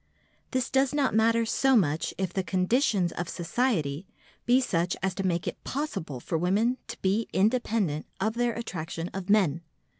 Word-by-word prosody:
This 255 Hz, -1 st, -1 dB
does 270 Hz, +1 st, +2 dB
not 280 Hz, -3 st, +2 dB
matter 230 Hz, +1 st, +3 dB
so 265 Hz, +3 st, +3 dB
much 160 Hz, -8 st, +2 dB
if 190 Hz, -2 st, -2 dB
the 190 Hz, -, 0 dB
conditions 190 Hz, -, +1 dB
of 175 Hz, 0 st, -4 dB
society 175 Hz, -, -1 dB, 0.4 s
be 245 Hz, +2 st, +5 dB
such 175 Hz, -9 st, 0 dB
as 190 Hz, -1 st, +1 dB
to 195 Hz, -, -3 dB
make 175 Hz, -2 st, 0 dB
it -, -, -5 dB
possible 255 Hz, -, -4 dB
for 160 Hz, +6 st, -2 dB
women 210 Hz, +8 st, +2 dB
to -, -, -7 dB
be 200 Hz, +4 st, +1 dB
independent 210 Hz, -, +1 dB
of 220 Hz, +3 st, 0 dB
their 240 Hz, 0 st, 0 dB
attraction 170 Hz, -6 st, -5 dB
of 190 Hz, -1 st, -6 dB
men. 180 Hz, -7 st, +3 dB
195 Hz, 170 wpm, -28 LUFS, 175-240 Hz, 0.4 s, be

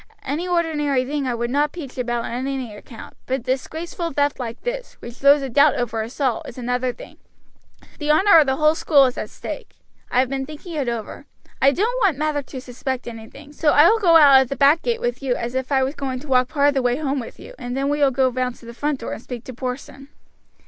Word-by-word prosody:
Any 310 Hz, +7 st, -3 dB
ordinary 300 Hz, -7 st, 0 dB
thing 285 Hz, 0 st, -2 dB
I 245 Hz, -, -1 dB
would 235 Hz, +1 st, -3 dB
not 290 Hz, +2 st, +1 dB
peach 295 Hz, -7 st, -8 dB
about 240 Hz, -2 st, -2 dB
on -, -, -5 dB, 0.2 s
any 260 Hz, -5 st, -4 dB
account, 225 Hz, +2 st, -12 dB
but 260 Hz, -, 0 dB
a -, -, -21 dB
disgraceful 320 Hz, +6 st, -3 dB
theft 285 Hz, +1 st, 0 dB
like 235 Hz, -2 st, -5 dB
this, -, -, -4 dB
which 235 Hz, -, -11 dB
throws 280 Hz, +3 st, +4 dB
a -, -, -2 dB
doubt 285 Hz, +3 st, +4 dB
over 230 Hz, -2 st, -2 dB
us 225 Hz, +6 st, -8 dB
all, 260 Hz, -5 st, +1 dB
is -, -, -10 dB
another 250 Hz, +1 st, -1 dB
thing; -, -, -13 dB, 0.8 s
the 295 Hz, -1 st, -3 dB
honor 335 Hz, +3 st, +6 dB
of 300 Hz, -, +3 dB
the 265 Hz, -, +2 dB
whole 305 Hz, +2 st, +3 dB
school 290 Hz, -3 st, +4 dB
is 250 Hz, -, -1 dB
at -, -, -5 dB
stake. -, -, -8 dB, 0.3 s
I 250 Hz, -, +1 dB
have 260 Hz, -, +3 dB
been 270 Hz, +1 st, -3 dB
thinking 310 Hz, +3 st, -9 dB
it 280 Hz, -6 st, -1 dB
over. 230 Hz, -3 st, -6 dB, 0.3 s
I 275 Hz, -, +6 dB
don't 460 Hz, -, -1 dB
want 380 Hz, -, +3 dB
Mather 300 Hz, -1 st, 0 dB
to 270 Hz, -1 st, -9 dB
suspect 255 Hz, 0 st, -5 dB
anything, 235 Hz, +6 st, -10 dB
so 300 Hz, 0 st, +2 dB
I 295 Hz, -, +7 dB
will 450 Hz, -, +3 dB
go 345 Hz, -5 st, +4 dB
out 280 Hz, -4 st, +8 dB
at 260 Hz, -, -2 dB
the 275 Hz, -, -2 dB
back 290 Hz, +4 st, +4 dB
gate 465 Hz, -1 st, -1 dB
with 485 Hz, -7 st, -2 dB
you, 260 Hz, -3 st, 0 dB
as 235 Hz, +1 st, -4 dB
if 260 Hz, +1 st, -3 dB
I 265 Hz, -1 st, +3 dB
was 265 Hz, +2 st, -1 dB
going 270 Hz, -3 st, -4 dB
to 300 Hz, -, -12 dB
walk 255 Hz, -2 st, +3 dB
part 285 Hz, 0 st, +2 dB
of -, -, 0 dB
the 270 Hz, -, +1 dB
way 245 Hz, -1 st, +1 dB
home 285 Hz, -2 st, -1 dB
with 235 Hz, -, -9 dB
you, -, -, -11 dB
and 245 Hz, +1 st, -4 dB
then 275 Hz, +1 st, 0 dB
we 290 Hz, +1 st, 0 dB
will 285 Hz, -2 st, +4 dB
go 265 Hz, 0 st, +2 dB
round 255 Hz, -1 st, -2 dB
to -, -, -17 dB
the 235 Hz, -, -9 dB
front 290 Hz, +1 st, -2 dB
door -, -, -4 dB
and -, -, -7 dB
speak 245 Hz, -1 st, -8 dB
to 255 Hz, -, -9 dB
Porson." 260 Hz, +2 st, -6 dB
275 Hz, 255 wpm, -21 LUFS, 250-300 Hz, 0.8 s, out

